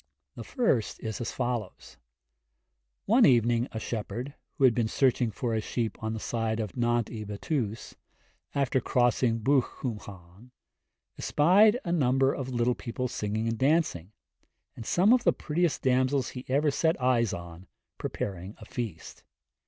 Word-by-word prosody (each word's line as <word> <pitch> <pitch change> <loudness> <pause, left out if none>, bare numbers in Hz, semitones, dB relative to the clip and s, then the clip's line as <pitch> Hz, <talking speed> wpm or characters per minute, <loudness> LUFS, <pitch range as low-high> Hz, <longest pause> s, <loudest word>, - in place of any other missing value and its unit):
The - - -8
first 225 - 0
is 110 -1 -4
as 115 - -3
follows: 120 -5 -4 1.1
One 235 +4 +5
evening 120 - +4
a 110 - -4
shepherd, 120 +5 -5 0.2
who 140 - -3
had 130 -3 +7
been 115 -1 0
searching 125 0 +2
for 115 +1 -3
his 110 -1 -1
sheep 115 -1 -3
on 110 0 -2
the - - -4
side 115 0 -2
of 105 -4 -4
Nant 120 -2 0
y 110 -3 -5
Bettws, 105 +2 -3 0.6
after 135 -2 +1
crossing 120 -1 +1
Bwlch 135 +4 +4
Cwm 120 -4 -6
Llan, 95 +5 -13 0.7
espied 205 +9 +4
a 170 - -1
number 135 -4 +2
of 135 -2 -4
little 120 0 +1
people 125 +2 -4
singing 110 0 -2
and 115 -1 -2
dancing, 135 - +1 0.6
and 115 - -9
some 195 +7 +4
of 250 - +3
the 170 - +4
prettiest 165 0 -1
damsels 130 0 +2
he 125 0 -8
ever 145 +3 +2
set 160 +3 +1
eyes 125 -4 +2
on 85 +1 -8 0.3
preparing 95 +1 -5
a 110 - -12
feast. 110 -9 -6
120 Hz, 155 wpm, -28 LUFS, 110-135 Hz, 1.1 s, had